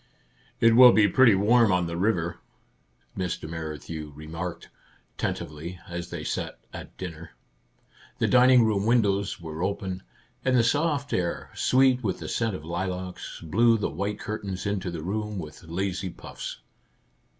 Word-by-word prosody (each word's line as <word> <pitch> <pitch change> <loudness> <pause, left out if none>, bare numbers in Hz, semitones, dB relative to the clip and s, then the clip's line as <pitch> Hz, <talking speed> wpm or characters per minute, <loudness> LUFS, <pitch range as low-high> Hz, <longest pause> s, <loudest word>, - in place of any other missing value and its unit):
"It 115 0 +5
will 125 0 +10
be 105 -2 +5
pretty 115 +2 +6
warm 110 +2 +4
on 90 -1 +2
the 85 0 -4
river," 85 -3 0 0.8
Mr. 90 -4 -3
Merrithew 80 -1 -6
remarked, 80 +3 -6 0.5
tentatively, 80 +4 -4
as 85 -1 -5
they - - -5
sat - - -3 0.2
at - - -9
dinner. 85 -3 -8 0.8
The - - +1
dining 125 -1 +6
room 105 -1 +1
windows 100 -4 +2
were 80 -1 -7
open, 95 -1 -2 0.4
and 130 -1 +3
the 120 - +5
soft 145 +3 +1
air, 85 -2 -2
sweet 130 -1 +3
with 95 -4 -1
the - - -7
scent 115 -4 -1
of 80 - -8
lilacs, 90 +1 -4
blew 115 +8 +3
the 105 - -2
white 100 +5 -3
curtains 100 -3 -5
into 100 -3 -1
the 85 -3 -5
room 105 +3 -3
with 80 -1 -8
lazy 95 +3 -2
puffs. - - -8
95 Hz, 150 wpm, -26 LUFS, 85-115 Hz, 0.8 s, will